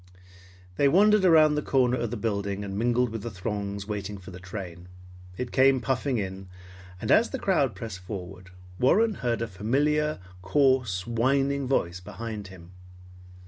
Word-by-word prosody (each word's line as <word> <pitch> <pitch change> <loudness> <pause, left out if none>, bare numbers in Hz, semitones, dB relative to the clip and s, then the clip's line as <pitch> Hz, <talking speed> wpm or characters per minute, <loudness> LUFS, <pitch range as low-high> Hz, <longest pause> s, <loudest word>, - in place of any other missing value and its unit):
They 140 - +4
wandered 205 +6 +5
around 160 -4 +6
the 150 - 0
corner 125 -3 +2
of 120 -1 -2
the 120 - -4
building 100 -2 -2
and 100 -1 -5
mingled 120 +3 +1
with 115 -1 -5
the 120 - -5
throngs 100 0 -4
waiting 105 -1 -4
for 95 -1 -11
the 90 - -10
train. 90 -2 -8 0.5
It 125 -1 -4
came 135 0 +4
puffing 130 0 -1
in, 95 -2 -5 0.5
and - - -2
as 230 - +5
the 265 - -4
crowd 150 - +1
pressed 110 -5 -7
forward, 90 0 -8 0.3
Warren 215 - +3
heard 115 -2 0
a - - -3
familiar, 145 +10 0 0.2
coarse, 120 -3 +2
whining 135 +4 +1
voice 95 -9 0
behind 105 +2 -7
him. 90 -2 -13
115 Hz, 160 wpm, -27 LUFS, 100-135 Hz, 0.5 s, around